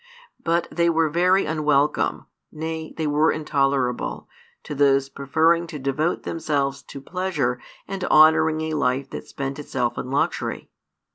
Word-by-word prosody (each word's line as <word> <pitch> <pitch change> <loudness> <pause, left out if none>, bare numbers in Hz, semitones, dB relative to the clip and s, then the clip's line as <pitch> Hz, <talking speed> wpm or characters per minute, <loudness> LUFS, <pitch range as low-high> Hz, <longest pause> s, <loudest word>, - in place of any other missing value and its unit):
But 170 0 +1
they 170 0 +2
were 160 -2 +2
very 180 +4 +3
unwelcome, 150 -2 +1 0.3
nay, 160 0 -5
they 160 - -1
were 150 +2 +3
intolerable, 135 -4 -1 0.4
to - - -6
those 135 -1 +3
preferring 160 +5 +1
to 155 - -7
devote 140 +5 -1
themselves 140 -4 -1
to 140 - -10
pleasure 145 -6 -2 0.3
and 195 -1 -5
honouring 155 0 +5
a 160 0 -2
life 135 -2 0
that - - -7
spent 135 +1 -5
itself 120 -4 -2
in 125 - -5
luxury. 140 +2 -2
150 Hz, 140 wpm, -23 LUFS, 140-160 Hz, 0.4 s, honouring